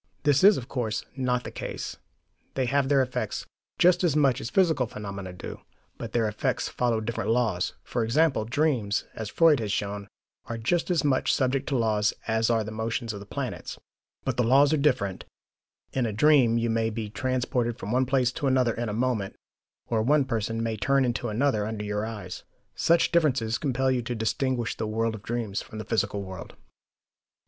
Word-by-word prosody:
This 145 0 +3
is, 205 +1 +8
of 125 - -6
course, 115 -6 -2
not 125 -2 0
the - - -7
case: - - -5 0.6
they 130 - +1
have 135 +1 +1
their 140 -2 +4
effects, 125 0 -3 0.3
just 180 +1 +4
as 165 -5 +2
much 140 -5 +3
as 115 - -4
physical 160 -9 +2
phenomena 100 -3 -6
do, 90 - -8 0.4
but - - -6
their 115 -2 +1
effects 105 0 -1
follow 120 -2 0
different 110 +1 -3
laws. 110 -7 +1
For 120 - -2
example, 135 +2 +2
dreams, 120 -5 0
as 110 -2 -5
Freud 160 -1 +4
has 105 -3 -2
shown, 100 0 -3 0.4
are 115 - -4
just 165 +12 0
as 175 -3 +2
much 140 -3 +2
subject 135 +1 0
to 135 - +1
laws 105 -3 +1
as 110 +1 +1
are 115 -2 +2
the 105 - -6
motions 110 +1 -3
of 100 - -6
the 100 - -11
planets. - - -5 0.5
But - - -2
the 125 - +3
laws 140 +5 +5
are - - +3
different: 125 -10 +1 0.7
in 130 -3 +1
a 110 - -3
dream 125 -1 +5
you 115 0 0
may 115 0 +1
be 110 -1 -4
transported 125 0 -1
from 100 - -5
one 130 +1 +2
place 130 -2 +2
to 145 +1 -2
another 130 -3 +3
in 120 0 -3
a - - -3
moment, 115 -4 -1 0.5
or 115 -2 +1
one 140 +4 +3
person 115 -2 -2
may 115 -1 -2
turn 135 +4 +2
into 120 -1 -1
another 110 -2 +1
under 110 -1 -4
your 105 +1 -2
eyes. 105 -5 -7 0.3
Such 170 0 +3
differences 130 -9 +2
compel 130 -2 +1
you 125 -1 +1
to 120 +1 -4
distinguish 120 +2 -1
the 110 - -2
world 115 +1 0
of 110 - -7
dreams 110 -3 -3
from 110 - -10
the 110 - -5
physical 100 -2 -1
world. 95 -3 -9
120 Hz, 195 wpm, -27 LUFS, 110-135 Hz, 0.7 s, is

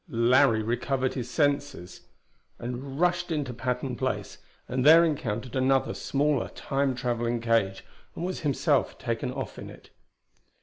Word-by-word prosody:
Larry 115 -1 +4
recovered 130 +3 -1
his 125 -2 -4
senses, 140 - -1 0.5
rushed 140 +9 -2
into 145 -5 -2
Patton 125 +1 -3
Place, 130 0 -3 0.3
and 125 0 -1
there 165 +4 +8
encountered 125 -6 -3
another, 130 0 +2
smaller, 145 -2 0
Time 135 -1 -1
traveling 120 -1 -1
cage, 115 -5 0 0.3
and 170 - -4
was 185 - -3
himself 145 -2 +1
taken 115 0 -3
off 135 -2 -6
in - - -8
it. - - -15
130 Hz, 130 wpm, -27 LUFS, 120-145 Hz, 0.5 s, there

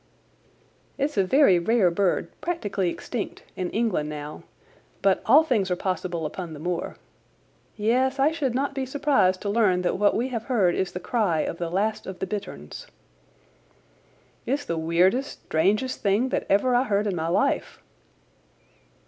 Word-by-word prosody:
"It's 290 +2 -1
a 195 - +3
very 195 -3 +5
rare 195 0 +3
bird—practically 195 - -1
extinct—in 185 -3 -5
England 210 -10 -1
now, 150 0 -7 0.6
but 195 -1 +3
all 285 +8 +7
things 220 -11 0
are 180 - +1
possible 180 -3 -3
upon 170 +1 -5
the 150 - -9
moor. 175 +2 -3 0.8
Yes, 255 +5 +1
I 280 +3 +3
should 275 -7 -2
not 275 +2 -1
be 270 - -2
surprised 260 -9 +1
to 205 - -3
learn 195 -5 +2
that 180 - 0
what 205 0 +3
we 245 +4 0
have 230 -3 -4
heard 205 -9 +2
is 190 +1 -2
the 180 - -4
cry 185 -6 0
of 165 - -4
the 170 -1 -2
last 210 +5 -1
of 190 -1 -6
the - - -3
bitterns." 75 - -7 1.6
"It's 280 +3 -1
the 170 - -2
weirdest, 175 +11 +1
strangest 205 +11 0
thing 210 +6 +2
that - - -2
ever 225 +6 +3
I 245 - +4
heard 205 -2 +1
in 200 -3 -1
my 160 -1 -2
life." 230 +11 0
200 Hz, 155 wpm, -25 LUFS, 175-250 Hz, 1.6 s, all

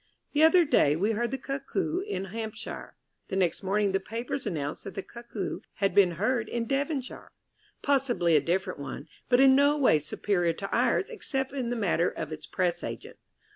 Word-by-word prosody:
The 295 - +2
other 335 +2 +6
day 150 - +4
we 200 +7 +1
heard 235 +2 0
the 270 - -3
Cuckoo 280 +7 -2
in 385 - -3
Hampshire. 225 0 -6 0.3
(The - - -4
next 180 -3 +1
morning 200 +1 +1
the 195 - +1
papers 230 +5 -4
announced 150 -6 -3
that 195 - -8
the 195 - -4
Cuckoo 235 -5 -6 0.2
had 195 -2 0
been 190 -3 +5
heard 215 +5 0
in 235 -1 -2
Devonshire 275 +1 -3 0.5
possibly 250 - +2
a 150 - +5
different 185 +2 -1
one, 140 +2 -6 0.2
but 245 -1 +5
in 265 0 +7
no 285 +2 +4
way 255 - +4
superior 175 +3 0
to 195 +4 -4
ours 255 - +2
except 270 - -2
in 255 -4 -2
the 245 - -1
matter 185 -5 +1
of 160 -1 -6
its 155 -1 -7
Press 175 -2 -1
agent.) - - -7
220 Hz, 185 wpm, -28 LUFS, 180-270 Hz, 0.5 s, in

